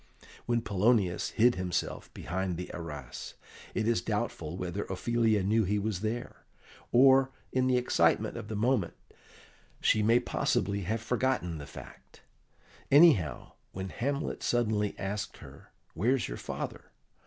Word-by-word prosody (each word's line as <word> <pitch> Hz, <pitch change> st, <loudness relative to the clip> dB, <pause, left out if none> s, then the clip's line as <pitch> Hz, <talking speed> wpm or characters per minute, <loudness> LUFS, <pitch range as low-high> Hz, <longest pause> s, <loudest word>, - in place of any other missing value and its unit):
When 120 Hz, -1 st, +1 dB
Polonius 100 Hz, -3 st, +2 dB
hid 120 Hz, +2 st, +4 dB
himself 90 Hz, -2 st, -3 dB
behind 95 Hz, -1 st, -3 dB
the 90 Hz, -, -6 dB
arras 75 Hz, -7 st, -7 dB, 0.4 s
it 110 Hz, -, 0 dB
is 115 Hz, -6 st, +2 dB
doubtful 80 Hz, -1 st, -3 dB
whether 90 Hz, +2 st, -3 dB
Ophelia 110 Hz, +1 st, +1 dB
knew 110 Hz, +3 st, +3 dB
he 105 Hz, +2 st, 0 dB
was 105 Hz, -2 st, -2 dB
there, 115 Hz, +3 st, -3 dB, 0.5 s
or, 135 Hz, +1 st, +6 dB, 0.2 s
in 130 Hz, 0 st, +1 dB
the 130 Hz, -1 st, +3 dB
excitement 125 Hz, -, +2 dB
of -, -, -6 dB
the 110 Hz, -, -4 dB
moment, 110 Hz, -4 st, +1 dB, 0.8 s
she 110 Hz, -, +3 dB
may 115 Hz, +3 st, +4 dB
possibly 100 Hz, -4 st, 0 dB
have 110 Hz, +4 st, -1 dB
forgotten 115 Hz, -9 st, 0 dB
the 70 Hz, -, -8 dB
fact. -, -, -13 dB, 0.7 s
Anyhow, 135 Hz, -, +5 dB, 0.2 s
when 95 Hz, 0 st, -5 dB
Hamlet 140 Hz, +7 st, -2 dB
suddenly 110 Hz, -4 st, 0 dB
asked 100 Hz, +1 st, -4 dB
her, -, -, -14 dB, 0.2 s
"Where's 120 Hz, +8 st, +1 dB
your -, -, -5 dB
father?" -, -, -6 dB
105 Hz, 135 wpm, -30 LUFS, 90-120 Hz, 0.8 s, or